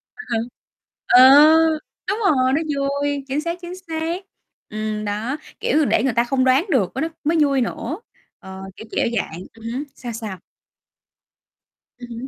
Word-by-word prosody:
À 435 - -9
ha. 230 - +1 0.7
Ờ. 250 - +7 0.9
Đúng 415 +3 0
rồi, 260 -5 +3
nó 315 - +2
vui, 280 0 -1
chính 280 +3 -1
xác, 340 +2 -3
chính 350 +1 -7
xác. 325 +4 -3 0.5
Ừm, 215 0 -3
đó, 220 +8 -2 0.2
kiểu, 305 -1 +2
để 225 - +2
người 265 -4 +1
ta 235 +1 +3
không 260 +1 0
đoán 260 +7 +3
được 220 -10 +2
cái 270 - -2
đó - - 0 0.2
mới 325 +3 +1
vui 275 -3 +3
nữa. 270 - -3 0.4
Ờ, 190 0 -10
kiểu, 220 - -11
kiểu - - +1
dạng 165 +2 -3
ừm 225 0 -14
hứm, 275 +3 -3
sao 240 -2 -7
sao? 215 -5 -6 1.6
Ừm 245 -1 -10
hứm. 235 +3 -6
260 Hz, 170 wpm, -21 LUFS, 225-300 Hz, 1.6 s, Ờ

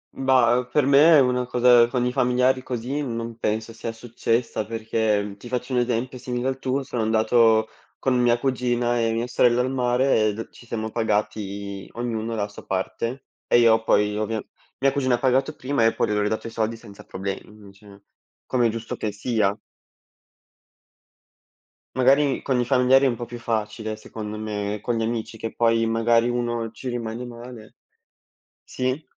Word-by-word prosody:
Bah, 130 -3 +3
uhm, 125 - -6
per 150 -3 +3
me 145 +3 +7
una 125 -1 +1
cosa 120 -1 +5
con 120 +1 -1
i 125 - 0
familiari 125 0 +2
così 125 +4 -3
non 115 -3 -4
penso 110 +1 -2
sia 115 0 -5
successa, 115 0 -2
perché 110 -2 -1
ti 120 - -10
faccio 125 +1 -3
un 125 - +3
esempio 125 +1 -1
simile 125 +1 -2
al 135 0 -4
tuo: 135 +1 -1
sono 125 -3 -3
andato 110 0 +3 0.3
con 130 -1 0
mia 120 -1 +3
cugina 120 -2 0
e 115 -1 +1
mia 115 +1 -1
sorella 125 0 +3
al 130 - -1
mare 125 -3 +2
e - - -2
d 115 - -7
ci 120 - -16
siamo 110 -1 -4
pagati 100 -3 -2
ognuno 115 -1 -3
la 105 -1 -1
sua 100 - -12
parte 115 +7 -3 0.2
e - - +4
io 115 -1 +5
poi 105 -1 +2
ovvia 110 +1 -2 0.4
mia 135 - +5
cugina 130 -3 +1
ha - - -3
pagato 135 +3 +1
prima 130 -2 -1
e 115 - +3
poi - - +1
io - - 0
le 105 - +1
ho - - +1
ridato 110 +1 -2
i 115 - -5
soldi 115 0 -2
senza 105 -3 -13
problemi, 95 +1 -5
mhmm, 105 -2 -15
cioè, 100 0 -17 0.4
come 120 -2 +2
è - - +1
giusto 115 0 -5
che 105 - -2
sia. 105 -1 0 2.4
Magari 135 +2 +3
con 130 -2 0
i 120 - +1
familiari 130 +1 +4
è - - +5
un 125 - 0
po' 120 - -6
più 120 0 -8
facile 110 -1 -3
secondo 110 0 -7
me, 105 -1 -3
è 105 - -9
con 120 - -1
gli 115 - 0
amici 115 0 -3
che 115 +1 -5
poi 115 -1 +2
magari 115 +1 +2
uno 120 -2 -2
ci 120 +3 -7
rimani 120 -1 -4
male. 120 -2 -11 0.9
Sì. 130 +4 -3
115 Hz, 185 wpm, -24 LUFS, 110-125 Hz, 2.4 s, me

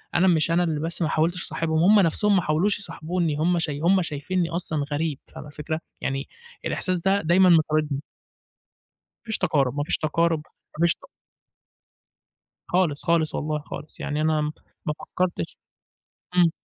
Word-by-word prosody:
أنا 180 +2 +4
مش 165 -2 +3
أنا 175 +1 +3
اللي 160 -3 -1
بس 165 +3 -3
ما 160 - +2
حاولتش 170 +3 +1
اصاحبهم، 160 -1 0
هم 205 +3 +7
نفسهم 200 +3 +3
ما 185 - +4
حاولوش 175 +7 +1
يصاحبوني، 170 -4 -2
هم 170 +3 +2
ش 160 - 0
هم 170 +6 +2
شايفينني 170 +3 -2
أصلًا 165 -4 -2
غريب، 150 -1 -1 0.2
فاهمة - - -8
الفكرة، 150 +2 -4 0.2
يعني 135 +1 -2 0.4
الإحساس 185 -1 0
ده 195 +3 +2
دايمًا 180 +3 +5
مطاردني. 155 -3 +3 1.2
ما - - -57
فيش 220 -2 -2
تقارب 140 -8 +1
ما 145 - +1
فيش - - 0
تقارب 165 +1 +1 0.4
ما 170 - +4
فيش 170 - +4
ت - - -58 1.7
خالص، 175 -5 +1
خالص، 170 -2 +2
والله 150 0 -1
خالص، 145 +1 -9
يعني 150 +1 -2
أنا 155 -1 +2 0.4
ما 150 - 0
فكّرتش 175 - -3 0.8
إمم. 175 -2 +5
165 Hz, 160 wpm, -25 LUFS, 150-180 Hz, 1.7 s, هم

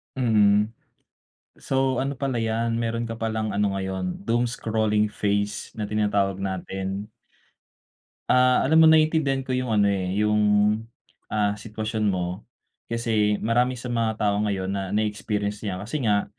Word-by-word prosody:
Mm. 105 -4 +3 0.9
So 135 -1 0
ano 135 +1 -2
pala 130 -3 -2
yan, 115 +1 -1
meron 115 0 -1
ka 115 0 -6
palang 110 -1 -2
ano 100 -1 0
ngayon, 95 -1 -4
doomscrolling 110 -2 0
phase 100 0 -2
na 110 - -3
tinatawag 100 -2 0
natin. 95 +2 -4 1.2
Ah, 125 0 +4
alam 160 +3 +5
mo 160 - +8
naiintindihan 155 -4 +3
ko 130 - -2
yung 130 -1 -1
ano 105 -2 +3
eh, 95 -1 0
yung, 105 0 +2 0.9
ah, 105 -1 +1
sitwasyon 110 0 -3
mo. 90 +1 -2 0.5
Kasi, 110 -3 +1
marami 125 +3 +1
sa 120 - -10
mga 115 -2 -1
tao 105 -1 +1
ngayon 100 -3 -1
na, 95 -1 -3
na-experience 105 0 -2
'yan, 100 -4 -3
kasi 140 +5 -3
nga 105 -3 +2
105 Hz, 140 wpm, -24 LUFS, 100-115 Hz, 1.2 s, mo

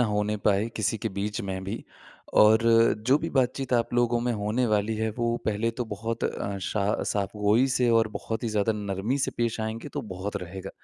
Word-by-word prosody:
होने 105 +1 0
पाए 105 +2 +3
किसी 110 +1 0
के 110 - -2
बीच 105 +1 -2
में 95 -1 -4
भी। 100 +4 -5 0.6
और 110 +2 +6 0.4
जो 135 +3 +6
भी 165 - -4
बातचीत 130 0 0
आप 120 0 +1
लोगों 120 -1 +2
में 120 0 0
होने 110 +3 0
वाली 105 0 +1
है 110 0 0
वो 120 0 +1
पहले 110 +2 +1
तो 120 +1 -4
बहुत 115 +2 -4
अ, 100 0 -2
स - - -3 0.4
साफ़गोई 105 +4 +2
से 125 -1 +2
और 110 -1 +2
बहुत 110 +2 -4
ही - - 0
ज़्यादा 110 +1 +1
नरमी 105 +5 -2
से - - 0
पेश 115 -1 0
आएँगे 110 +1 -4
तो - - -2
बहुत 95 +3 -4
रहेगा। 90 +2 -7
110 Hz, 200 wpm, -27 LUFS, 105-115 Hz, 0.6 s, और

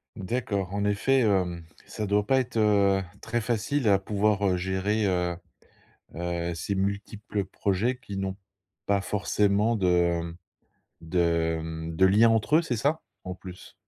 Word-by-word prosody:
D'accord. 100 -3 -3
En 100 0 -1
effet, 105 +7 +2
hem, 95 -7 +1 0.2
ça 105 - -5
doit 105 +1 +2
pas 130 +5 +3
être, 125 -2 -3
heu, 100 -3 +3 0.2
très 120 +1 -1
facile 120 +4 -1
à 100 -2 +5
pouvoir, 100 0 +1
heu, 90 -1 +2
gérer, 95 +4 0
heu 90 -2 0 0.8
heu, 85 0 -3
ces 85 +4 -3
multiples 100 +1 -3
projets 105 +8 -1
qui 100 -6 -7
n'ont 95 0 -3 0.5
pas 100 -1 +1
forcément 105 +3 +1
de 90 -3 +2
mmh, 85 0 -7 0.6
de 85 -1 +1
mmh, 80 0 -6
de 95 +3 +5
liens 105 +4 +5
entre 115 +7 +3
eux, 170 - +4
c'est 130 -7 -2
ça? 145 +8 0 0.2
En 90 0 -5
plus. 90 -1 -11
100 Hz, 155 wpm, -27 LUFS, 90-110 Hz, 0.8 s, à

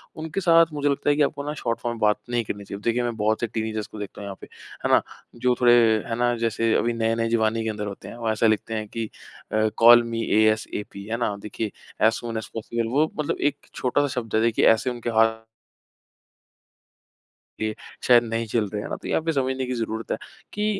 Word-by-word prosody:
उनके 160 +4 -4
साथ 165 -2 +6
मुझे 145 -1 -3
लगता 140 +1 0
है 145 - +4
कि 150 - +1
आपको 140 0 0
ना 150 - -3
शॉर्ट 120 -5 -2
फॉर्म 120 -1 -3
में 115 - -10
बात 105 -1 +3
नहीं 120 -1 0
करनी 100 0 -5
चाहिए। 100 0 -7
देखिए, 120 +2 +1
मैं 120 -1 -2
बहुत 110 +1 +1
से 120 - 0
टीनेजर्स 110 -1 -3
को 110 - -10
देखता 105 0 -7
हूँ - - -6
यहाँ 100 -1 -7
पे, - - -10 0.4
है - - +2
ना? - - +6 0.3
जो 125 +1 +1
थोड़े 120 -1 +7 0.3
है 115 - -2
ना, 120 0 +2
जैसे 115 0 +1
अभी 120 0 +1
नए-नए 115 0 0
जवानी 115 0 +1
के 110 - -1
अंदर 105 -1 -4
होते 100 - -8
हैं, - - -8
वो 115 -1 -2
ऐसा 110 +1 +2
लिखते 110 +1 0
हैं 110 -1 -3
कि 115 0 -4 0.4
अ, 110 0 +2
कॉल 120 +1 +8
मी 115 -1 -3 0.2
एएसएपी, 110 -2 0
है 115 +2 -2
ना? 110 -4 -1
देखिए 105 0 -4 0.3
ऐज़ 110 - +5
सून 115 -1 -4
ऐज़ 110 - -5
पॉसिबल। 115 +1 -3
वो 155 +1 +3
मतलब 150 - -1
एक - - -31 0.2
छोटा-सा 145 +3 +1
शब्द 115 -2 -5
है, 110 - +3
देखिए 115 0 +2
ऐसे 115 +3 -1
उनके 120 -1 -4
हा 110 0 +5 2.4
ये 110 0 -1 0.3
शायद 120 -1 +7
नहीं 115 0 -2
चल 110 -1 0
रहे 105 0 -4
है - - -6
ना, - - -3
तो - - -9
यहाँ - - +1
पे 165 - +1
समझने 130 -1 -1
की 125 - -3
ज़रूरत 115 -1 -4
है - - 0 0.4
कि 210 0 -1
115 Hz, 230 wpm, -24 LUFS, 110-120 Hz, 2.4 s, कॉल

